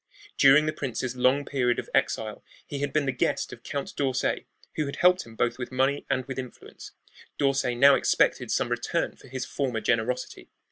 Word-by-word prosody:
During 140 +3 +6
the 155 - -1
prince's 130 -2 -4
long 130 +3 +2
period 125 -4 0
of - - -4
exile - - 0 0.2
he 140 - -5
had 145 0 -2
been 150 0 +1
the 135 - +1
guest 125 - -1
of - - -11
Count 140 -1 -5
d'Orsay, 135 -3 -1 0.3
who 150 - -1
had 140 - -5
helped 180 -5 +3
him 115 - -13
both 120 +2 0
with 125 - -5
money 135 +2 0
and 130 -2 0
with 130 0 -5
influence. 125 -1 -10 0.4
D'Orsay 135 -3 +1
now 140 +3 +7
expected - - +2
some - - 0
return - - -1
for - - -17
his 130 0 -5
former 130 -5 -2
generosity. 115 +3 -2
135 Hz, 190 wpm, -26 LUFS, 125-140 Hz, 0.4 s, now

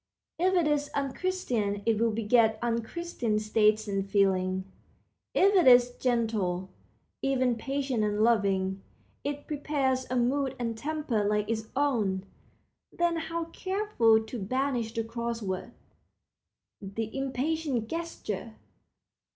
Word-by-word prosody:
If 375 +2 +3
it 350 -3 +3
is 295 -1 +1
unchristian 260 - -1
it 225 -2 +2
will 230 - +4
beget 220 0 +3
unchristian 235 0 -1
states 215 0 +2
and 195 -1 -1
feelings. 190 -2 +1 0.7
If 395 +2 +5
it 365 -7 +5
is 245 -1 +7
gentle, 215 -7 0 0.5
even 255 -3 +2
patient 265 -1 -1
and 210 0 +1
loving, 195 -4 +2 0.4
it 285 0 -4
prepares 275 -3 -1
a 255 - -1
mood 265 +2 +1
and 230 -2 -2
temper 290 -4 -1
like 210 0 +1
its 220 -1 -2
own. 220 -10 +1 0.7
Then 345 -1 +1
how 330 +1 -3
careful 375 - +2
to 230 +2 -6
banish 245 +2 -1
the 230 0 -2
cross 235 +1 -3
word, 190 -2 -4 1.1
the 215 +3 -5
impatient 270 -2 -1
gesture! 235 - -5
235 Hz, 120 wpm, -29 LUFS, 210-280 Hz, 1.1 s, is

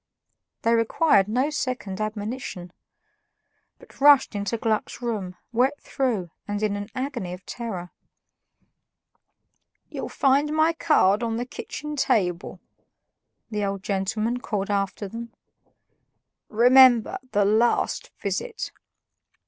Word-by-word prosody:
They 230 - +3
required 230 -2 +3
no 255 +7 0
second 250 -9 -3
admonition, 215 -4 -5 1.0
but - - -19
rushed 285 -3 +6
into 205 +3 -2
Gluck's 220 -1 -1
room, 210 -7 -3 0.2
wet 260 +5 +1
through 225 - -2 0.2
and 205 +1 -3
in 210 -1 +1
an 205 0 -5
agony 255 -9 -3
of 180 +1 -10
terror. 190 -7 -6 2.0
"You'll - - -5
find 285 +2 +2
my 315 +1 +3
card 215 - +3
on 230 -1 -1
the 240 - -2
kitchen 300 +4 -7
table," 180 -10 0 0.9
the 210 -1 -1
old 195 -1 -3
gentleman 215 +4 -1
called 205 -4 -3
after 200 0 -1
them. 230 +3 -8 1.2
"Remember, 245 0 +6
the 205 0 +3
LAST 220 +4 +1
visit." 475 -2 -3
225 Hz, 110 wpm, -25 LUFS, 200-255 Hz, 2.0 s, rushed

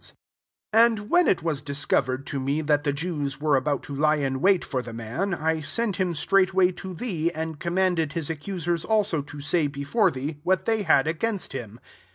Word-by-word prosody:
SO - - -9 0.6
And 225 -2 +3
when 355 0 +5
it 175 - +2
was 155 -4 -1
discovered 140 -2 0
to 140 - -3
me 140 +4 -1
that 145 -1 +1
the 145 - +2
Jews 145 -2 -3
were 150 -1 +2
about 140 +1 0
to 145 - -8
lie 155 +2 +3
in 135 -2 -2
wait 190 -1 +3
for 130 -3 -2
the 120 -2 -9
man, 115 - -3
I 160 0 -1
sent 210 +5 -1
him 180 -3 0
straightiway 190 +3 +3
to 185 0 -8
thee, 170 -6 -1
and 160 -2 -5
commanded 175 -3 0
his 165 -4 -2
accusers 170 +1 -3
also 210 -8 +1
to 145 +1 -10
say, 150 +1 +1
before 145 +9 +1
thee, 145 +1 -5
what 180 +3 +1
they 225 -1 +1
had 135 -8 +4
against 185 +5 -2
him. 115 -3 -7
160 Hz, 200 wpm, -25 LUFS, 145-185 Hz, 0.6 s, when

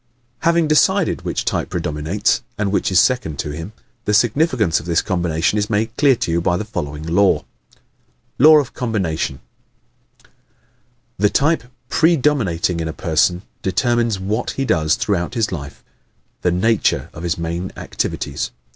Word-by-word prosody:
Having 170 +1 +2
decided 185 +5 +2
which - - -3
type - - -1
predominates 75 +7 -1 0.2
and 100 -2 -1
which 100 - 0
is 90 - +5
second 100 - +1
in 75 - -4
him, 80 +6 -7 0.3
the 105 - +2
significance 120 - +2
of 80 - -11
this 85 -1 +2
combination 85 +2 0
is 105 - -1
made 110 +1 -1
clear 140 -1 +4
to 85 - -2
you 85 +1 +1
by 90 +1 +1
the 105 - -4
following 75 -8 -5
law: 95 +4 +2 0.9
Law 155 +4 +8
of 145 -4 0
Combination 95 - -2 0.8
¶ - - -25 0.9
The 105 +1 +4
type 145 +4 +1 0.2
PREDOMINATING 135 - +2
in 80 - -2
a 80 - -4
person 90 +2 +1 0.2
determines 115 +2 +1
WHAT 105 +5 -2
he 135 - 0
does 80 - +2
throughout 100 +2 -1
his 110 -3 0
life 70 -6 -7 0.6
the 90 - +2
NATURE 100 +5 +1
of 80 - -9
his 85 -1 -1
main 85 +2 -3
activities. - - -3
100 Hz, 155 wpm, -19 LUFS, 85-120 Hz, 0.9 s, Law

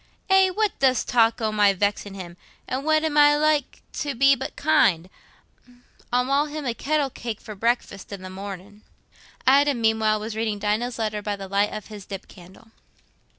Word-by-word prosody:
"Eh, 385 0 +6
what 425 +2 0
dost 260 -3 +2
talk 230 -2 +3
o' 220 -1 0
my 205 -2 +4
vexin' 205 0 -2
him? 175 -3 -8 0.3
An' 260 +2 -3
what 310 +1 +2
am 300 -2 +1
I 295 0 +6
like 300 -2 0
to 285 -3 -3
be 275 +3 +5
but 265 - -6
kind? 220 - +2 1.0
I'll 250 +1 +2
ma' 280 +3 +2
him 300 -1 -6
a 240 - -1
kettle 285 +2 -1
cake 230 -3 -6
for 215 - -9
breakfast 210 -2 -2
i' - - -4
the 185 -1 -9
mornin'." 200 +1 -9 0.6
Adam, 280 0 +4
meanwhile, 220 -1 +2
was 215 +1 -6
reading 220 -2 -1
Dinah's 215 +4 -1
letter 215 -2 -2
by 205 0 -3
the 195 -1 -8
light 200 +2 +1
of 215 - -6
his 210 -3 -11
dip 195 -1 -7
candle. 190 +5 -16
225 Hz, 185 wpm, -24 LUFS, 205-275 Hz, 1.0 s, Eh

